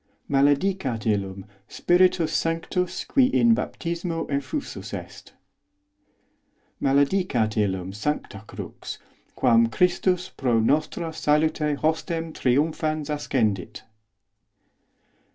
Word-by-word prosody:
Maledicat 140 - +1
os - - -11
illum 100 -3 -1 0.2
Spiritus 180 -2 +2
Sanctus 165 +2 -1
qui 265 -3 +4
in 235 -3 +4
baptismo 170 -5 -3
ef 140 -1 -2
os - - -1
fusus - - -7
est. - - -10 1.5
Maledicat 140 - +2
illum 95 -3 -1
sancta 110 -2 -3
crux, - - -8 0.4
quam 115 -2 +4
Christus 180 +5 +1
pro 120 -4 0
nostrâ 155 +7 0
salute 150 0 +1
hostem 160 +1 -1
triumphans 155 +3 0
ascendit. 115 - -1
150 Hz, 95 wpm, -25 LUFS, 115-170 Hz, 1.5 s, qui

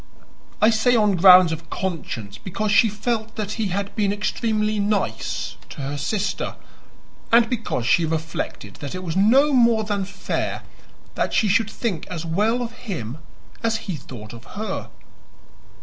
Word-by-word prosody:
I 220 - +7
say 235 +3 +3
on 210 -3 +3
grounds 180 -1 +8
of 160 0 -6
conscience 125 - -4
because 205 +3 -2
she 220 +2 +5
felt 220 +1 -2
that 210 -2 -3
he 220 -1 -1
had 200 +2 -3
been 205 -3 +1
extremely 215 0 0
"nice" 200 - -1
to - - -8
her 140 +2 -3
sister, 195 +5 -2 0.8
and 230 0 +6
because 225 - -2
she 145 +7 +4
reflected 160 -10 -4
that 145 +4 -6
it 185 - -5
was 165 -2 -3
no 260 +10 +5
more 235 -3 +4
than 205 -2 -1
fair 195 0 -3 0.5
that - - -1
she 215 - +3
should 210 +2 +2
think 195 -8 -3
as 170 -2 -5
well 215 +9 +1
of 235 - -5
him 160 - -6 0.4
as 225 -1 +1
he 190 - -3
thought 120 -6 -10
of 115 0 -11
her. 210 -2 -4
200 Hz, 160 wpm, -23 LUFS, 165-220 Hz, 0.8 s, grounds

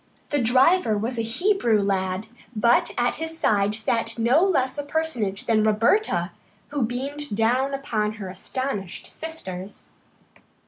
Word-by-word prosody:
The 290 -2 +1
driver 255 - +4
was 230 +3 -2
a - - +2
Hebrew 235 - +1
lad, 190 0 -1 0.3
but 235 +3 +3
at 240 0 +1
his 325 +1 -5
side 205 -6 +2
sat 230 +1 -1
no 240 +9 +4
less 280 -7 +1
a - - -2
personage 270 -11 -2
than 225 -2 +3
Roberta, 215 - +2 0.4
who 290 -1 -2
beamed 265 +2 -3
down 255 +5 +2
upon 220 -6 -1
her 210 -3 -7
astonished 195 0 -4
sisters. 200 - -7
235 Hz, 135 wpm, -24 LUFS, 210-280 Hz, 0.4 s, driver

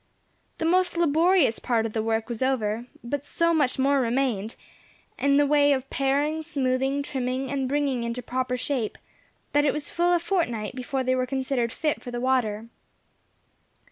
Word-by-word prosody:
The 325 - -2
most 355 +1 +2
laborious 335 -4 +3
part 230 -3 0
of 220 - -4
the 220 - 0
work 225 0 -1
was 235 -1 -5
over, 240 -3 0 0.2
but 275 +4 -3
so 335 +3 +1
much 290 -6 +2
more 275 +1 +3
remained, 235 -4 -1 0.6
in 280 0 +3
the 290 - +5
way 290 0 +4
of 265 -1 -2
paring, 285 +3 +1
smoothing, 270 -2 0
trimming, 260 -1 -3
and 270 -2 -1
bringing 280 -4 0
into 235 +1 -4
proper 250 +1 -2
shape, 250 -3 -2 0.6
that 290 0 +4
it 290 - +2
was 300 -1 -5
full 345 +1 +2
a 350 - +4
fortnight 330 - -1
before 260 +1 -3
they 255 0 +1
were 255 0 0
considered 260 -2 -1
fit 300 +4 -1
for 250 - -8
the 240 0 -4
water. 240 -4 0
265 Hz, 175 wpm, -26 LUFS, 245-290 Hz, 0.6 s, the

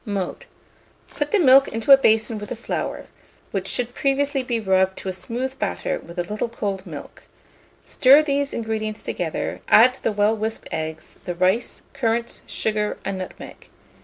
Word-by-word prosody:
Mode. 200 -5 -4 0.7
Put 290 0 -2
the 425 - +3
milk 275 -6 +6
into 225 +5 0
a - - +13
basin 220 -4 +2
with 210 - -8
the - - -3
flour, 230 - -4 0.5
which 195 -1 -3
should 245 +2 -3
previously 275 +1 0
be 245 -2 -2
rubbed 190 -2 +2
to 190 - -5
a - - -3
smooth 255 +7 -4
batter - - -2
with 170 +1 -13
a 175 - 0
little 210 +6 -3
cold 200 -4 -4
milk; 150 -4 -10 0.6
stir 275 +4 +6
these 280 -1 0
ingredients 220 -1 -3
together; - - -3
add 250 +4 +6
the - - 0
well 210 +1 +2
whisked 220 +1 -4
eggs, 160 0 -6
the 175 - -3
rice, 185 +6 0
currants, 235 -3 -1
sugar, 210 -1 -1
and 190 - -3
nutmeg. 185 - -9
220 Hz, 165 wpm, -23 LUFS, 195-255 Hz, 0.7 s, a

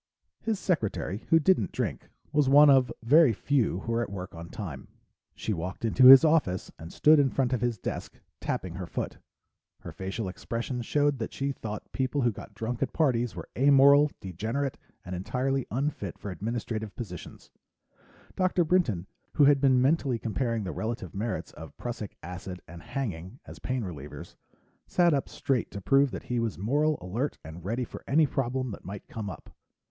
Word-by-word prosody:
His 220 -2 -1
secretary, 110 - -2
who 165 - +6
didn't 150 - +2
drink, - - -3 0.2
was 145 -3 +3
one 145 +1 +8
of 130 -3 +4
very 145 +1 +6
few 115 -5 0
who 115 - -4
were 115 0 +1
at 120 - -3
work 95 -1 -7
on 85 0 -9
time. - - -7 0.5
She 110 - -2
walked 90 +5 -4
into 125 +3 +6
his 135 +4 +11
office 150 - +1
and 80 +2 -9
stood 155 0 +5
in 140 -2 +4
front 130 -1 0
of 125 - 0
his 120 -2 0
desk, - - -5 0.2
tapping 90 -3 -3
her 90 0 -6
foot. - - -4 0.6
Her - - -8
facial 95 +3 -4
expression 120 +6 -4
showed 145 +2 +1
that 110 - -4
she 140 +1 -1
thought 105 -5 -7
people 135 +2 -1
who 120 -1 +3
got 105 - -11
drunk 115 +1 -4
at - - -1
parties 125 -7 +1
were - - -7
amoral, 140 +2 +6
degenerate, 110 - -3 0.3
and 90 - -6
entirely 130 +8 -1
unfit 125 - -3
for 100 - -6
administrative 110 +2 -4
positions. 90 -8 -9 0.8
Dr. 185 -1 +2
Brinton, 155 - +1 0.3
who 150 - +4
had 140 -1 +5
been 130 -2 +5
mentally 135 -3 +2
comparing 115 0 -2
the 90 - -4
relative 110 0 -4
merits 110 +3 -3
of 80 0 -12
Prussic 115 -4 -6
acid 90 +1 -7
and 85 +1 -11
hanging 115 - -5
as - - -11
pain 130 -2 -2
relievers, 75 -6 -8 0.5
sat 175 -2 +3
up 140 - -1
straight 130 -5 -1
to 100 - -7
prove 135 +9 +3
that - - -7
he 120 -1 -2
was 115 -3 -2
moral, 145 +9 +1
alert, 115 +11 -3
and 80 +2 -9
ready 115 +7 -2
for - - -9
any 155 +3 +4
problem 130 -2 -2
that - - -9
might 100 +1 -8
come 110 -3 -5
up. 90 - -10
120 Hz, 180 wpm, -28 LUFS, 100-140 Hz, 0.8 s, his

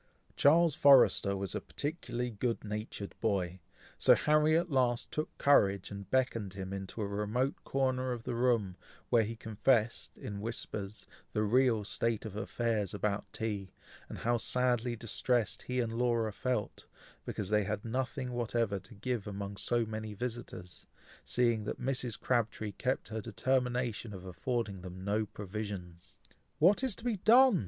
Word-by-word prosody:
Charles 165 +2 +5
Forrester 135 - +6
was 95 -1 -4
a - - -2
particularly 125 -5 -4
good 115 +2 -2
natured 105 -1 -5
boy, 95 -5 0 0.4
so - - +7
Harry 155 +1 +4
at 170 0 -1
last 125 -3 +1
took 155 - -3
courage 100 -10 +4
and 100 -1 -7
beckoned 115 -6 0
him 95 0 -5
into 100 +3 -4
a - - -1
remote 105 +7 -1
corner 130 -1 0
of 120 -2 -4
the - - -3
room, 115 -6 +1 0.3
where 115 - +6
he 110 +1 -3
confessed, 110 +1 0
in 100 -1 -6
whispers, 105 -2 -5 0.3
the 105 - +1
real 115 0 +3
state 115 +1 -1
of 105 -2 -6
affairs 110 -2 -1
about 100 0 -2
tea, 100 -4 -4 0.3
and - - -6
how 120 +1 +1
sadly 125 0 +1
distressed 115 0 0
he 125 0 -2
and 115 -2 -1
Laura 115 -2 +1
felt, 125 -1 -2 0.4
because 100 -3 -4
they 105 -1 +3
had 105 +1 -3
nothing 130 +2 -2
whatever 115 -4 0
to 105 +5 -14
give 115 0 -3
among 100 0 -5
so 120 +3 +1
many 110 -1 -5
visitors, 110 -6 -6 0.4
seeing 120 -3 +2
that - - -4
Mrs. 125 -3 -2
Crabtree 110 -3 0
kept 130 +3 -2
her 110 0 -3
determination 125 -1 -1
of 95 0 -9
affording 100 +1 -2
them 90 0 -8
no 105 +1 +1
provisions. 95 -3 -7 0.4
"What 190 - +5
is 255 -7 0
to - - -10
be 240 -4 0
done!" 235 +1 +6
115 Hz, 155 wpm, -32 LUFS, 100-125 Hz, 0.4 s, so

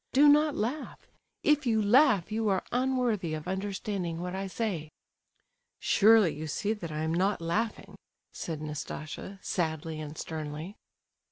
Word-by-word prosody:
Do 285 +3 +7
not 295 0 +5
laugh; 250 +8 -3 0.4
if 295 -3 +3
you 220 -2 +3
laugh 215 - +4
you 220 0 0
are 190 -2 +1
unworthy 245 -9 0
of 155 +2 -7
understanding 190 -2 -3
what 180 +1 -4
I 195 +1 -3
say." 185 -7 -3 0.9
"Surely 215 -5 +5
you 155 +2 -5
see 205 +8 -1
that 175 -7 -7
I 155 +1 -2
am 160 +1 0
not 190 +4 +1
laughing," 205 +7 -2 0.4
said 155 -2 -5
Nastasia, 155 +5 -6
sadly 160 -2 -2
and 155 0 -7
sternly. 155 +4 -5
190 Hz, 145 wpm, -29 LUFS, 160-225 Hz, 0.9 s, Do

